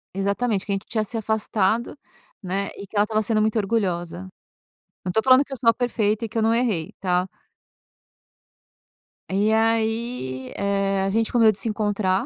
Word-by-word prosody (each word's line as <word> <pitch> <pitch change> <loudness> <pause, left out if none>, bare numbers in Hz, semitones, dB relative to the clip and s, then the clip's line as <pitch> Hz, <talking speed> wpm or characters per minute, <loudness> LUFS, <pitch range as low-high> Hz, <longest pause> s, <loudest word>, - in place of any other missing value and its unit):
Exatamente. 200 +1 0
Que 205 - -4
a - - +2
gente 195 - -6
tinha 220 -3 -1
se 225 +2 -5
afastado, 220 +2 0 0.5
né, 195 +2 -2
e 200 - -8
que 205 - -16
ela 205 - +5
estava 215 0 0
sendo 215 0 +1
muito 220 +1 +1
orgulhosa. 190 -4 -1 0.8
Não 180 - -2
tô 220 - +2
falando 260 +1 +6
que 285 - -22
eu - - -4
sou 230 -1 +3
a - - +5
perfeita 225 -3 0
e - - -6
que 230 - -5
eu - - +2
não 225 +1 +3
errei, 220 -9 0
tá. 180 -1 +1 2.0
E 205 +3 +2
aí, 225 - 0
eh, 195 -1 0
a 195 - 0
gente 225 +3 0
combinou 230 -3 +5
de 205 - -4
se 230 - -1
encontrar, 205 -3 0
215 Hz, 185 wpm, -23 LUFS, 195-225 Hz, 2.0 s, falando